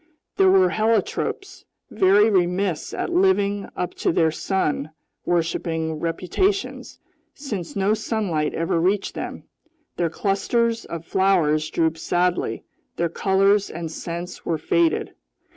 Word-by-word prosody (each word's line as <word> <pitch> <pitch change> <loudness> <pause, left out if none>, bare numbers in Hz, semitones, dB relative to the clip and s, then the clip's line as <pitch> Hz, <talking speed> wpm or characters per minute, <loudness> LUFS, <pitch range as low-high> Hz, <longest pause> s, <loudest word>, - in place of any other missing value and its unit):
There 190 -1 +5
were 185 -1 +5
heliotropes, 225 - -1 0.3
very 205 +1 +5
remiss 180 -2 0
at - - -3
living 200 +2 +2
up 180 - -3
to - - +2
their 160 -1 +2
sun 155 -4 -1 0.4
worshipping 160 -2 -1
reputations 185 - -1 0.4
since 210 - -6
no 200 +1 +2
sunlight 200 -9 -1
ever 165 0 0
reached 195 +3 +1
them; - - -6 0.5
their 170 -1 +1
clusters 225 +6 0
of 170 -1 -7
flowers 165 -6 +2
drooped 160 -1 0
sadly, 180 +2 0 0.3
their 170 0 0
colors 195 +3 +2
and 165 -1 -6
scents 170 +2 -6
were 165 - -1
faded. 170 +2 +1
180 Hz, 120 wpm, -23 LUFS, 165-200 Hz, 0.5 s, There